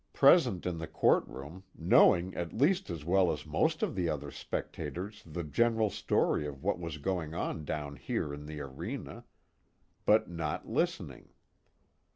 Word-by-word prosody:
Present 135 - +5
in 90 -2 -2
the 80 - -5
courtroom, 75 +8 0 0.2
knowing 90 +1 +5
at 85 -1 -4
least 180 - +2
as 80 -4 -5
well 90 +1 +4
as - - -5
most - - +1
of - - 0
the 90 -3 0
other 75 -2 -3
spectators 90 +7 -5
the 85 +2 -4
general 110 +7 +2
story 75 - +1
of 70 -2 -8
what - - 0
was 85 -3 -5
going 80 0 -2
on 80 -2 -3
down 70 -1 -4
here 70 - -2
in 75 +1 -8
the 75 -1 -6
arena; 70 -1 -6 0.8
but 110 +1 +5
not 85 -3 -4
listening. - - -2
85 Hz, 155 wpm, -31 LUFS, 75-95 Hz, 0.8 s, Present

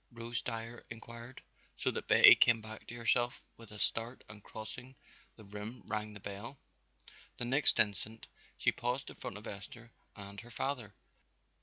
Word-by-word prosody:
Rose 115 0 -3
Dyer 115 0 -5
inquired, 115 +2 -9 0.3
so - - +1
that - - -4
Betty - - +11
came 120 -2 +5
back 110 0 -9
to 120 - -7
herself 120 +1 +2
with 115 -2 -12
a 105 - -8
start 115 +4 0
and 105 -2 -11
crossing 125 +4 -7 0.4
the 110 - -13
room 105 +4 -7
rang 105 0 -2
the - - -7
bell. 100 +7 -6 0.8
The 120 - -1
next 135 +5 +3
instant 110 +2 +2 0.3
she - - +3
paused 125 +3 -2
in - - -12
front - - -5
of 105 - -10
Esther 115 +3 -8 0.2
and 100 -1 -8
her 120 - -13
father. 120 -3 -3
115 Hz, 165 wpm, -34 LUFS, 105-120 Hz, 0.8 s, Betty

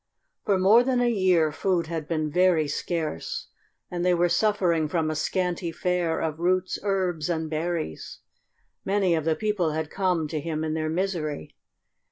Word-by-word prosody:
For 200 -3 +3
more 205 +6 +6
than 255 -1 +1
a 240 -1 +2
year 180 -7 +3
food 175 +2 0
had 160 -2 -4
been 155 -2 -1
very 180 -3 +3
scarce, 155 - -3 0.4
and 175 -1 -2
they 180 0 +3
were 175 0 +2
suffering 175 -4 +2
from 160 -1 0
a - - -3
scanty 180 +1 -1
fare 175 -1 0
of 160 -1 -2
roots, 185 +1 0
herbs, 185 -5 -1
and 160 -2 -2
berries. 160 - -3 0.7
Many 195 -2 +2
of 160 -2 0
the 160 -1 +2
people 205 -7 0
had 155 0 -3
come 180 -5 0
to 155 - -2
him 155 0 -3
in 155 -1 -1
their 155 0 -1
misery. 160 - -3
170 Hz, 170 wpm, -26 LUFS, 155-185 Hz, 0.7 s, more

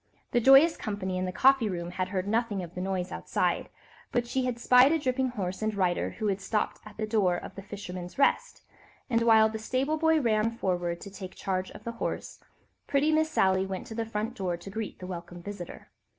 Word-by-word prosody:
The 240 - +3
joyous 270 +7 +7
company 190 -3 -3
in 185 - -1
the 185 - -2
coffee 260 +2 +4
room 175 -2 -4
had 185 0 -2
heard 185 0 -2
nothing 220 -3 0
of 170 0 -9
the 180 - -5
noise 185 -1 -2
outside, - - -1 0.4
but 240 -1 +1
she 255 +2 -1
had 250 -2 -1
spied 250 +3 +6
a 325 - +3
dripping 260 -2 0
horse 190 -6 -4
and 215 -1 -1
rider 185 -3 +1
who 215 - -3
had 200 -1 0
stopped 210 +2 -1
at 210 - -13
the 220 - -1
door 210 -5 +2
of - - -8
"The 195 - -8
Fisherman's 185 -2 -7
Rest," 280 - +1 0.5
and 230 -1 +3
while 220 -1 +6
the 220 0 -5
stable 260 +7 0
boy 320 0 +3
ran 220 -4 +2
forward 175 -4 -1
to 200 - -9
take 190 -1 -8
charge 185 -1 -2
of 210 - -12
the 235 - -4
horse, - - -3 0.5
pretty 290 +2 +2
Miss 315 0 +2
Sally 190 -7 +2
went 190 -1 -5
to - - -8
the 230 +1 -2
front 220 +1 -3
door 185 -7 -2
to 185 - -10
greet 220 +1 -5
the 185 - -8
welcome 175 -1 -7
visitor. 200 -3 -8
210 Hz, 220 wpm, -28 LUFS, 185-240 Hz, 0.5 s, joyous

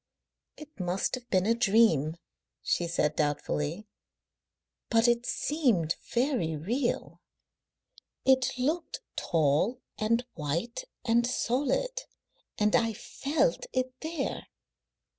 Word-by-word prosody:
"It 305 -4 -13
must 180 +1 -1
have 245 -2 -5
been 185 -1 +2
a 225 - +4
dream," 195 - +3 0.5
she 175 - +1
said 150 -3 0
doubtfully, 150 +4 -1 1.0
"but 230 0 +4
it 240 0 +2
seemed 235 - +1 0.2
very 240 - +1
real. 240 - -2 1.0
It 260 -1 +5
looked 310 +7 -1
tall 160 - +1 0.2
and 230 +3 +1
white 170 - -3 0.2
and 235 0 +3
solid, 295 - 0 0.6
and 210 -2 +3
I 230 -1 +2
felt 320 - -1
it 255 0 0
there." 315 -3 -3
230 Hz, 105 wpm, -29 LUFS, 175-260 Hz, 1.0 s, It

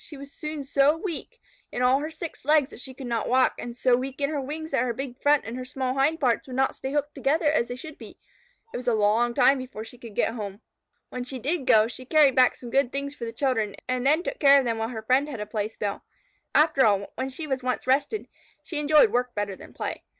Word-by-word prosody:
She 300 - -10
was 280 0 -10
soon 305 -2 -5
so 280 +2 +3
weak 390 +7 -6 0.3
in 250 - -2
all 255 +2 +4
her 305 +2 -4
six 320 0 -8
legs 295 0 +3
that - - -11
she 260 +1 -8
could 265 - -8
not 235 -1 -2
walk, 255 +1 +4
and 240 0 -7
so 250 0 +4
weak 265 +2 -4
in 280 +1 0
her 295 -2 -2
wings 315 +4 -6
that 270 - +2
her 245 -2 -1
big 265 0 -6
front 290 0 +3
and 225 - -5
her 255 - -4
small 255 0 -3
hind 285 +5 +1
pairs 250 -3 +1
would 255 - -7
not 265 +1 +1
stay 265 - -5
hooked 290 0 -1
together 295 +4 0
as 295 -5 +2
they 245 - -5
should 310 +4 -10
be. - - -11 0.6
It - - -3
was 250 0 -8
a 240 - +3
long 220 +3 +2
time 270 +1 +5
before 250 -4 -7
she 235 +2 -13
could 230 -4 -11
get 225 - +1
home. 205 -2 -6 0.5
When 250 - -5
she 260 +1 -5
did 275 +3 -2
go, 220 -3 +6
she 245 +2 -9
carried 290 -2 +4
back 255 -1 +5
some 240 -2 -10
good 270 -2 +2
things 280 0 -3
for 245 -5 -7
the 230 - -5
children, 230 -4 -1
and 255 -1 -1
then 305 +6 +3
took - - -4
care 280 -1 +7
of 270 - +2
them 230 -2 -1
while 225 0 -2
her 220 -3 -6
friend 260 +6 +2
had 255 -6 -6
a 210 - -3
playspell. 210 -1 -3 0.5
After 300 -3 +5
all, 200 -2 +2
when 260 +1 -3
she 290 +5 -6
was 265 -3 -2
once 255 0 -2
rested, 285 - +1 0.4
she 315 - -4
enjoyed 295 -6 +5
work 245 +1 -1
better 205 -2 -2
than - - -13
play. - - -5
260 Hz, 260 wpm, -26 LUFS, 240-290 Hz, 0.6 s, care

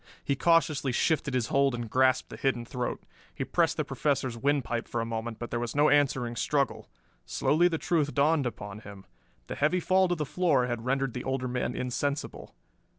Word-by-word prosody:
He 140 - 0
cautiously 155 -4 +2
shifted 140 +1 0
his 125 -3 0
hold 140 -2 +2
and 120 -1 -5
grasped 130 +2 +2
the - - -6
hidden 125 -3 -1
throat. 125 0 -4 0.3
He - - -3
pressed - - +1
the - - 0
Professor's 135 -4 -1
windpipe 125 -2 -1
for 120 - -3
a 115 - -1
moment, 115 0 -4
but 120 - -7
there 120 - -1
was 120 +2 -4
no 145 +1 +4
answering 130 -5 +2
struggle. 140 +4 -1 0.4
Slowly 170 +4 +2
the 165 -2 -1
truth 155 -3 0
dawned 145 -1 +3
upon 105 -3 -7
him. 100 -2 -12 0.4
The - - -6
heavy 155 +5 +1
fall 185 +2 +3
to 175 - 0
the 155 -2 -2
floor 150 -5 +2
had 120 -2 -4
rendered 135 -1 0
the 125 - -5
older 130 -1 -2
man 125 0 -2
insensible. 130 +3 -3
135 Hz, 195 wpm, -28 LUFS, 120-145 Hz, 0.4 s, no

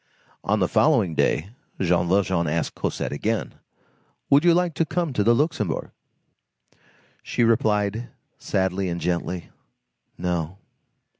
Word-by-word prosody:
On 105 +2 +1
the 95 -4 +2
following 115 - +3
day, 80 +4 +1 0.3
Jean 85 -1 +2
Valjean 95 -2 +2
asked 80 +2 -1
Cosette - - -3
again:— 110 +10 -2 0.8
"Would 140 +2 +6
you 175 - +6
like 175 -1 +1
to 165 - +1
come 165 -2 -2
to 105 - +1
the 115 +3 +4
Luxembourg?" 115 - -1 1.3
She 120 - -1
replied, 110 0 +1 0.3
sadly 95 0 -1
and 85 0 -3
gently:— 90 0 -2 0.7
"No." 90 0 -2
100 Hz, 125 wpm, -24 LUFS, 90-120 Hz, 1.3 s, Would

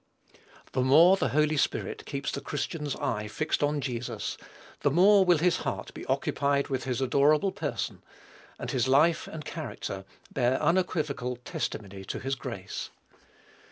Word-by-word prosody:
The 130 - 0
more 160 +9 +7
the - - 0
Holy 155 +1 +2
Spirit - - -1
keeps 140 -1 -3
the 140 - -4
Christian's 150 +1 -3
eye 105 -1 -2
fixed 155 +9 -1
on 145 0 +1
Jesus, 120 -4 -3 0.4
the - - +2
more 190 +6 +6
will 180 -2 +4
his 170 +2 +2
heart - - -4
be - - -9
occupied 140 0 +1
with 130 -3 -2
his 125 -1 -1
adorable 145 +8 +3
Person, - - -4 0.6
and - - -4
his 130 -2 +1
life 155 +5 +4
and 155 -1 -7
character 125 -11 -5 0.3
bear 130 0 +2
unequivocal 155 -8 0
testimony 100 -5 -5
to - - -4
his 135 +1 -2
grace. 130 - -5
140 Hz, 150 wpm, -28 LUFS, 125-155 Hz, 0.6 s, more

